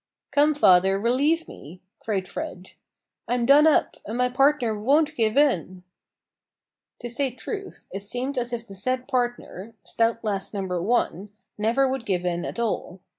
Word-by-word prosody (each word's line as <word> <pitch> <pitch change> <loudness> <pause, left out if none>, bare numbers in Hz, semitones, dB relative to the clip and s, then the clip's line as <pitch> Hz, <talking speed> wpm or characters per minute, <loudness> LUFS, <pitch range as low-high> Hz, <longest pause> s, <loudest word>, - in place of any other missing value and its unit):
"Come, 290 +1 +3
father, 195 -5 +4
relieve 285 +9 +1
me!" 170 +6 -12 0.2
cried 195 -4 -2
Fred. 180 +1 -7 0.6
"I'm 245 -1 0
done 290 +4 +6
up, 310 - +2
and 220 +3 -5
my 250 0 +2
partner 265 -3 +2
won't 290 +8 +2
give 225 -1 +1
in." 185 - +1 1.2
To - - -4
say 260 +3 -1
truth, 390 - -7
it 195 - -4
seemed 245 +7 -4
as 245 -1 -2
if 235 -1 -4
the 200 - -12
said 255 +6 -2
partner, 240 -5 -3
(stout 230 0 0
lass 200 -1 -3
Number 185 -3 -2
1), 205 -2 0 0.3
never 235 +6 +2
would 260 -2 -3
give 180 -3 -1
in 175 -1 -1
at - - -6
all. 220 -5 -3
235 Hz, 160 wpm, -24 LUFS, 195-270 Hz, 1.2 s, done